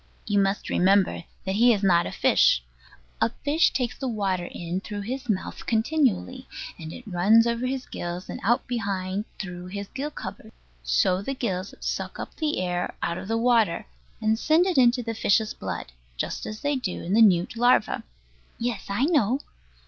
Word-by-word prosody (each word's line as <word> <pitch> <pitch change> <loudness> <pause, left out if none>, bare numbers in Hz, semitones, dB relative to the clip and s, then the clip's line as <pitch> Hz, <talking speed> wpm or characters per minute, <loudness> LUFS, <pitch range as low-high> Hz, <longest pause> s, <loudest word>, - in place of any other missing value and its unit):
You 205 -1 +2
must 195 0 0
remember 190 -2 +3 0.2
that 190 +1 -1
he 240 +2 +6
is 205 -2 -2
not 175 -3 +4
a - - -5
fish. - - +4 0.6
A - - +4 0.2
fish 305 +4 +4
takes 250 -3 -1
the 265 - -4
water 195 -6 -1
in 175 +1 -4
through 205 0 -5
his 245 +4 -5
mouth 195 -3 -3
continually, 255 - +1 0.3
and 160 -1 -7
it 245 - -10
runs 210 +4 +4
over 235 +1 0
his 260 0 -3
gills, 175 +1 -5
and - - -6
out 235 +3 +2
behind 200 -4 -2
through 180 -2 -6
his 200 +1 -6
gill 275 +3 -4
covers. - - -8 0.3
So 60 - +2
the 270 +7 -3
gills 190 -6 -3
suck - - -3
up - - -6
the 305 - -1
air 180 -1 -2
out 170 +1 -1
of - - -8
the 225 +1 0
water, 230 -6 +2 0.3
and 220 +1 +1
send 315 +6 +4
it 370 -2 0
into 245 0 +4
the 230 - -3
fish's 215 0 +2
blood, - - -5 0.3
just - - -3
as 215 0 -6
they 290 0 +1
do 230 -9 -3
in 180 - -2
the 225 - +5
newt 185 -2 +4
larva. 245 -2 +3 0.5
Yes, 235 -3 -3
I 205 +7 +1
know. 275 - +2
215 Hz, 185 wpm, -26 LUFS, 185-245 Hz, 0.6 s, he